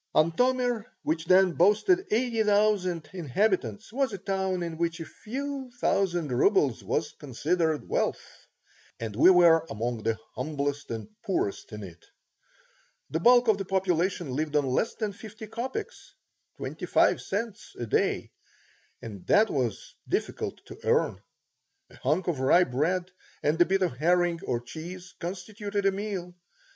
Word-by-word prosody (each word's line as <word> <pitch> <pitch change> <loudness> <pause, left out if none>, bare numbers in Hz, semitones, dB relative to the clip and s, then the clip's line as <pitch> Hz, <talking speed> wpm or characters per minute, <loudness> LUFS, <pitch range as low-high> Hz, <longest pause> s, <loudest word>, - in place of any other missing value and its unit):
Antomir, 245 +7 +2 0.2
which 160 +1 -1
then 185 +1 +5
boasted 215 - +3
eighty 230 0 +1
thousand 200 -6 +2
inhabitants, 180 - -1
was 270 0 +1
a 200 - -4
town 190 -1 -1
in 165 -1 -5
which 170 0 -1
a 165 - -5
few 270 - -5
thousand 175 - +1
rubles 135 - +2
was 150 0 -1
considered 155 +3 -1
wealth, - - -3 0.5
and 110 -3 -5
we 130 - +7
were 170 -3 +6
among 115 +1 -3
the 115 0 0 0.2
humblest 145 -1 -3
and 115 -2 -5 0.2
poorest 190 - -2
in 105 -1 -7
it. 85 -3 -11 1.1
The 160 - 0
bulk 245 +5 +6
of 215 -2 +4
the 195 - -3
population 180 -4 0
lived 150 +1 -2
on 145 -1 +3
less 130 - 0
than 215 -3 -3
fifty 220 +2 -10
copecks 240 - -6 0.4
(twenty - - -5
five - - +3
cents) 205 +1 -4
a 120 - -3
day, 110 - 0 0.7
and 100 -5 -9
that 215 +1 +4
was 125 -6 -2 0.2
difficult - - -3
to - - -11
earn. - - +1 0.7
A - - -15
hunk 155 +7 0
of 165 -6 -1
rye 140 +7 +5
bread 175 +7 -1 0.3
and 155 +4 +2
a - - +8
bit 190 +1 +1
of 150 -9 -1
herring 175 +2 +2
or 120 -1 0
cheese 175 +8 -9
constituted 200 +3 -4
a 195 - +5
meal. 195 -3 -4
180 Hz, 150 wpm, -28 LUFS, 150-205 Hz, 1.1 s, a